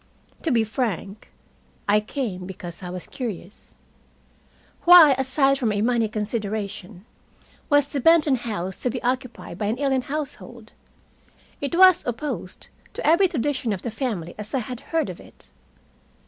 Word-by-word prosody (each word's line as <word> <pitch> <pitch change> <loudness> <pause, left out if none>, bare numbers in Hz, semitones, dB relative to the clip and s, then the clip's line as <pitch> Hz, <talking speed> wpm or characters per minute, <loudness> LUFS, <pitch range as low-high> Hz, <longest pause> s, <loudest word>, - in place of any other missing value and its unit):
To 330 - -1
be 235 -5 +3
frank, 215 -3 -4 0.6
I 205 +1 +5
came 210 -5 -4
because 175 -2 -8
I 180 - -6
was 180 0 -6
curious. 210 -6 -7 1.1
Why, 345 -5 +9
aside 270 +1 +2
from 235 -5 +1
a 205 0 -1
money 230 -2 +1
consideration, 210 -3 -4 0.6
was 290 -2 +4
the 285 - -3
Benton 305 -2 +5
house 195 -6 -4
to 250 - -2
be 245 +1 -5
occupied 250 -7 -3
by 205 - -1
an 220 +4 -1
alien 270 -2 +1
household? 250 -5 -5 0.9
It 285 +3 -2
was 370 -1 +7
opposed 245 +5 -4 0.2
to - - -5
every 340 +5 +5
tradition 265 - -1
of 190 - -6
the 235 - -3
family 215 - -3
as 210 +5 -5
I - - +2
had 250 0 -6
heard 325 -1 +1
of - - -11
it. - - -16
240 Hz, 150 wpm, -24 LUFS, 205-275 Hz, 1.1 s, Why